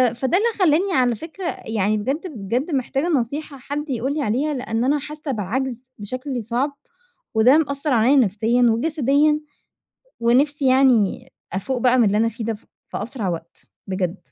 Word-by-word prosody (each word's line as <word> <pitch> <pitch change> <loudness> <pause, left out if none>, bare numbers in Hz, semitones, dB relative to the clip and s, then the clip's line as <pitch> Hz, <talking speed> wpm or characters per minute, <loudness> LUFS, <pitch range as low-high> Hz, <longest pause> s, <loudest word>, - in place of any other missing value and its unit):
فده 265 +8 +1
اللي 435 +4 +2
خلّاني 365 +2 +3
على 250 -2 +3
فكرة 325 - -8 0.2
يعني 215 -1 0
بجد، 270 - -2
بجد 235 - -2
محتاجة 275 +2 -1
نصيحة 285 0 -2
حد 285 +3 -5
يقول 260 +2 -1
لي 305 - -2
عليها؛ 275 +5 0
لأن 230 -2 -2
أنا 285 +3 +2
حاسة 300 0 -6
بعَجْز 250 +3 -3
بشكل 255 +4 -4
صعب، 255 +6 -2 0.6
وده 245 +6 +6
مأثّر 280 -2 0
عليَّ 240 +4 +4
نفسيًا 225 +1 +2
وجسديًا، 295 +4 +2 0.8
ونفْسِي 270 +4 +2
يعني 255 -6 +3 0.2
أفُوق 250 +8 -2
بقى 255 +1 +4
من 245 - +5
اللي 205 0 +2
أنا 225 +1 +3
فيه 230 0 -6
ده 225 - -1
ف 210 - -13 0.2
في - - -4
أسرع 225 -4 -4
وقت، 170 0 -6 0.3
بجد. 185 -1 -2
255 Hz, 165 wpm, -22 LUFS, 225-290 Hz, 0.8 s, وده